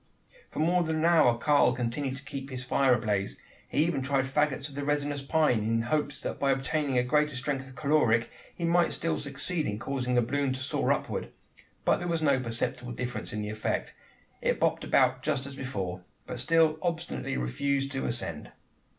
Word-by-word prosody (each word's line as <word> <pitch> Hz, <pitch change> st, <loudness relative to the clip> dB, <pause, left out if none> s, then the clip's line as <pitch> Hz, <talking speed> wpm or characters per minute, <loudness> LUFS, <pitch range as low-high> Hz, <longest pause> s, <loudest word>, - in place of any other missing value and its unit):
For -, -, -12 dB
more 175 Hz, +3 st, +3 dB
than 160 Hz, -2 st, 0 dB
an 155 Hz, +1 st, +1 dB
hour 155 Hz, -9 st, +5 dB
Karl 140 Hz, -1 st, +4 dB
continued 130 Hz, +2 st, -2 dB
to 140 Hz, -, -11 dB
keep 140 Hz, -1 st, -6 dB
his 130 Hz, -1 st, -5 dB
fire 130 Hz, 0 st, +3 dB
ablaze. 105 Hz, -4 st, -1 dB, 0.3 s
He 150 Hz, -, +2 dB
even 160 Hz, -5 st, 0 dB
tried 135 Hz, 0 st, +1 dB
faggots 140 Hz, 0 st, 0 dB
of 140 Hz, -, -12 dB
the 140 Hz, +1 st, -4 dB
resinous 145 Hz, -1 st, 0 dB
pine: 145 Hz, -4 st, +2 dB
in 115 Hz, +2 st, +1 dB
hopes 145 Hz, +3 st, -1 dB
that -, -, -4 dB
by 140 Hz, -, +2 dB
obtaining 135 Hz, 0 st, 0 dB
a 125 Hz, -, +4 dB
greater 150 Hz, +3 st, +2 dB
strength 135 Hz, 0 st, -2 dB
of 130 Hz, -, -14 dB
caloric 135 Hz, -5 st, +2 dB, 0.3 s
he 170 Hz, -, -1 dB
might 170 Hz, 0 st, +3 dB
still 165 Hz, 0 st, -1 dB
succeed 150 Hz, +4 st, -2 dB
in 105 Hz, -, -2 dB
causing 125 Hz, +1 st, -2 dB
the 120 Hz, -, +4 dB
balloon 140 Hz, +2 st, 0 dB
to 130 Hz, -, -4 dB
soar 130 Hz, -, 0 dB
upward; -, -, -2 dB, 0.6 s
but -, -, +4 dB
there 175 Hz, -, -4 dB
was 165 Hz, -2 st, 0 dB
no 140 Hz, -3 st, +4 dB
perceptible 120 Hz, 0 st, -3 dB
difference 120 Hz, -2 st, -4 dB
in 105 Hz, 0 st, -3 dB
the 105 Hz, -, -3 dB
effect. 110 Hz, 0 st, -2 dB, 0.5 s
It -, -, +1 dB
bobbed -, -, +1 dB
about 130 Hz, 0 st, +2 dB
as 140 Hz, -2 st, -1 dB
before, 95 Hz, -9 st, -4 dB, 0.2 s
but 125 Hz, -, -6 dB
still 160 Hz, +3 st, +3 dB
obstinately 170 Hz, -, -2 dB
refused 135 Hz, -, -1 dB
to 135 Hz, -1 st, -2 dB
ascend. 100 Hz, -10 st, -4 dB
135 Hz, 195 wpm, -29 LUFS, 125-150 Hz, 0.6 s, hour